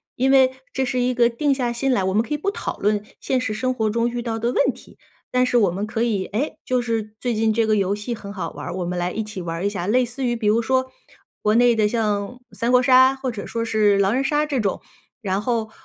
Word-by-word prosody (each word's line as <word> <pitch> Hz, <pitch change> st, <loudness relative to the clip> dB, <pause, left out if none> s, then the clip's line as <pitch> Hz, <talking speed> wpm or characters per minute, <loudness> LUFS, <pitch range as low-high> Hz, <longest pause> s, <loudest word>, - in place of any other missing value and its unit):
因 260 Hz, +2 st, +1 dB
为 265 Hz, -1 st, +5 dB, 0.2 s
这 265 Hz, -, -1 dB
是 255 Hz, 0 st, -1 dB
一 250 Hz, 0 st, +1 dB
个 240 Hz, -1 st, +4 dB
定 275 Hz, +4 st, +1 dB
下 245 Hz, -3 st, -1 dB
心 270 Hz, +3 st, 0 dB
来， 200 Hz, -7 st, +2 dB
我 190 Hz, -, 0 dB
们 215 Hz, -, +3 dB
可 270 Hz, -, -4 dB
以 295 Hz, -, 0 dB
不 395 Hz, -, -1 dB
讨 -, -, -5 dB
论 210 Hz, 0 st, 0 dB, 0.2 s
现 260 Hz, -1 st, 0 dB
实 220 Hz, -4 st, -2 dB
生 255 Hz, +3 st, -1 dB
活 220 Hz, -3 st, 0 dB
中 230 Hz, +2 st, +1 dB
遇 240 Hz, 0 st, -3 dB
到 230 Hz, -1 st, -3 dB
的 235 Hz, +2 st, -1 dB
问 -, -, +2 dB
题， -, -, -17 dB, 0.3 s
但 250 Hz, 0 st, +3 dB
是 250 Hz, -1 st, +2 dB
我 200 Hz, -7 st, +3 dB
们 195 Hz, +4 st, -3 dB
可 225 Hz, +1 st, -1 dB
以， 205 Hz, -5 st, 0 dB
哎， 250 Hz, +9 st, -3 dB
就 255 Hz, 0 st, 0 dB
是 225 Hz, -3 st, -2 dB
最 245 Hz, -1 st, -1 dB
近 220 Hz, 0 st, +2 dB
这 225 Hz, +1 st, +2 dB
个 215 Hz, -, +2 dB
游 200 Hz, -1 st, +1 dB
戏 210 Hz, +4 st, -4 dB
很 200 Hz, -3 st, -8 dB
好 180 Hz, -5 st, -5 dB
玩 -, -, -8 dB
儿， -, -, -4 dB
我 180 Hz, -, -2 dB
们 180 Hz, +1 st, -3 dB
来 175 Hz, +1 st, -1 dB
一 220 Hz, -, -3 dB
起 210 Hz, -3 st, -7 dB
玩 165 Hz, -1 st, -4 dB
儿 180 Hz, -, -3 dB
一 -, -, +2 dB
下。 190 Hz, -3 st, -4 dB
类 250 Hz, +3 st, +3 dB
似 245 Hz, +3 st, -5 dB
于 240 Hz, -1 st, +1 dB
比 225 Hz, -2 st, -2 dB
如 220 Hz, +3 st, +3 dB
说， 260 Hz, +2 st, 0 dB, 0.5 s
国 210 Hz, +1 st, +2 dB
内 240 Hz, 0 st, +5 dB
的 215 Hz, -1 st, +3 dB
像 210 Hz, +1 st, -1 dB
三 235 Hz, +2 st, -1 dB
国 250 Hz, -, +5 dB
杀， 260 Hz, +1 st, +6 dB
或 265 Hz, -1 st, -3 dB
者 215 Hz, -3 st, -7 dB
说 230 Hz, 0 st, -3 dB
是 210 Hz, -2 st, +3 dB
狼 200 Hz, +1 st, +2 dB
人 265 Hz, +2 st, +1 dB
杀 295 Hz, +2 st, +1 dB
这 280 Hz, -4 st, -1 dB
种， 195 Hz, -3 st, -1 dB, 0.4 s
然 195 Hz, -1 st, -1 dB
后 225 Hz, -1 st, -1 dB
230 Hz, 300 characters per minute, -22 LUFS, 210-250 Hz, 0.5 s, 杀